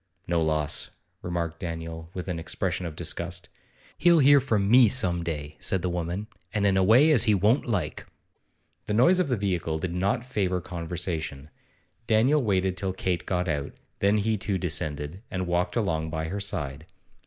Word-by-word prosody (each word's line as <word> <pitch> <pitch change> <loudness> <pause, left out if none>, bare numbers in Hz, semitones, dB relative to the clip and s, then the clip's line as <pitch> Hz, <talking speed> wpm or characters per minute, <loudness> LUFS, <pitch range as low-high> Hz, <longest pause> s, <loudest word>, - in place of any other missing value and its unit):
'No 85 -1 +1
loss,' 75 -2 0 0.3
remarked 85 -2 -3
Daniel, 80 -1 -6
with 90 0 -5
an 90 -3 -3
expression 85 +2 -2
of 80 - -7
disgust. 85 +2 -4 0.5
'He'll 175 -1 +6
hear 145 -1 +7
from 110 -6 +1
me 120 +2 +7
some 95 -7 +1
day,' 75 -3 -5
said 95 - -1
the 90 - 0
woman, 90 +4 -3 0.3
'and 105 -2 0
in 100 -1 +3
a 95 - +3
way 125 +11 +6
as 145 - +4
he 105 -3 +4
won't 105 +9 +2
like.' 105 -6 -2 0.8
The 105 - 0
noise 150 +11 +5
of 185 - +2
the 125 -3 0
vehicle 90 -5 -1
did 85 +2 -3
not 100 +7 0
favour 95 -7 -1
conversation. 85 -4 -4 0.6
Daniel 125 +7 +4
waited 95 -4 0
till 95 -1 -2
Kate 90 -2 -2
got 90 -1 0
out, 75 -3 -2 0.3
then 100 +2 +3
he 110 +1 +1
too 100 0 -1
descended, 75 0 -3
and 90 -1 -2
walked 90 0 0
along 80 -8 0
by 80 0 -3
her 100 +3 -3
side. 75 -6 -3
90 Hz, 175 wpm, -26 LUFS, 85-105 Hz, 0.8 s, hear